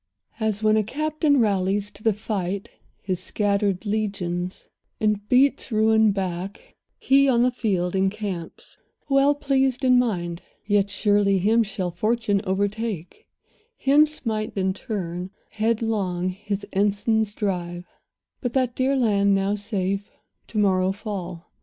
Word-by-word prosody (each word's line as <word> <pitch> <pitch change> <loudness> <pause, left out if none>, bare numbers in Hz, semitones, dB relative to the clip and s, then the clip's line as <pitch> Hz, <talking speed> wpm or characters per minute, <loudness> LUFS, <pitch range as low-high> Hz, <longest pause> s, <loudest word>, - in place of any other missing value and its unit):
As 220 -1 -1
when 215 0 +4
a 215 - +2
captain 305 - +1
rallies 200 -1 +1
to 205 - -11
the 220 - +3
fight 200 -2 -3 0.3
His 185 -2 -2
scattered 200 0 0
legions, 195 -4 -3 0.3
and 210 -1 0
beats 265 +1 +3
ruin 220 0 +4
back, 190 +1 -5 0.2
He, 275 +1 +4
on 240 -2 +4
the 250 - +3
field, 190 -7 -1
encamps, 190 -3 -3 0.3
well 275 +1 +4
pleased 270 -2 +1
in 250 -1 +6
mind. 175 -8 -1 0.2
Yet 205 -1 +2
surely 205 0 +2
him 215 +5 +3
shall 195 -4 -2
fortune 215 +2 0
overtake, 205 - -3 0.5
Him 290 +3 +5
smite 220 -8 -3
in 190 0 +1
turn, 185 -5 -5 0.2
headlong 215 -5 0
his 200 +2 -4
ensigns 205 +2 +1
drive; 175 -3 -3 0.6
And 245 -3 -2
that 255 -2 +1
dear 265 +1 +1
land, 200 -5 +3
now 195 +1 +1
safe, 200 -1 -2 0.4
to 220 - -7
morrow 190 -2 +3
fall. 185 -4 -6
205 Hz, 130 wpm, -24 LUFS, 190-225 Hz, 0.6 s, in